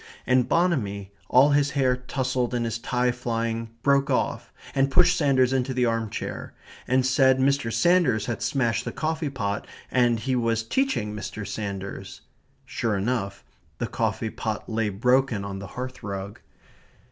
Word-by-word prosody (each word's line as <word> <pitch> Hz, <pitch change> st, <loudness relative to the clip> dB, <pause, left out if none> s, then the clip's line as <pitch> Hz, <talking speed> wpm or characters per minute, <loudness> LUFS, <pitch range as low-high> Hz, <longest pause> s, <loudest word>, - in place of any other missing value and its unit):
And 125 Hz, -1 st, +2 dB
Bonamy, 105 Hz, -, 0 dB, 0.2 s
all 135 Hz, +4 st, +6 dB
his 145 Hz, 0 st, +3 dB
hair 130 Hz, -2 st, +3 dB
touzled 125 Hz, -1 st, -2 dB
and 120 Hz, -1 st, 0 dB
his 115 Hz, 0 st, -3 dB
tie 125 Hz, +1 st, +1 dB
flying, 115 Hz, -2 st, -2 dB
broke 140 Hz, 0 st, +3 dB
off, -, -, -1 dB, 0.2 s
and 135 Hz, 0 st, +2 dB
pushed 175 Hz, +6 st, +5 dB
Sanders 135 Hz, -5 st, +3 dB
into 130 Hz, 0 st, 0 dB
the 125 Hz, -1 st, +2 dB
arm 115 Hz, -1 st, 0 dB
chair, -, -, -6 dB, 0.3 s
and 130 Hz, 0 st, +2 dB
said 130 Hz, 0 st, +4 dB
Mr. 135 Hz, -3 st, +1 dB
Sanders 170 Hz, -, +3 dB
had 120 Hz, -, -3 dB
smashed 120 Hz, -5 st, 0 dB
the -, -, -4 dB
coffee 160 Hz, -1 st, -2 dB
pot 100 Hz, -6 st, -3 dB, 0.2 s
and 120 Hz, -2 st, +3 dB
he 130 Hz, +3 st, -1 dB
was 115 Hz, -2 st, +1 dB
teaching 115 Hz, -, 0 dB
Mr. 105 Hz, 0 st, -6 dB
Sanders 100 Hz, -2 st, -6 dB, 0.4 s
Sure 110 Hz, -4 st, -1 dB
enough, 100 Hz, -2 st, -2 dB, 0.3 s
the -, -, -2 dB
coffee -, -, -2 dB
pot -, -, -4 dB
lay 110 Hz, -1 st, 0 dB
broken 125 Hz, +1 st, +1 dB
on 100 Hz, -1 st, -5 dB
the 100 Hz, -, -7 dB
hearthrug. 105 Hz, -6 st, -5 dB
125 Hz, 155 wpm, -25 LUFS, 110-135 Hz, 0.4 s, all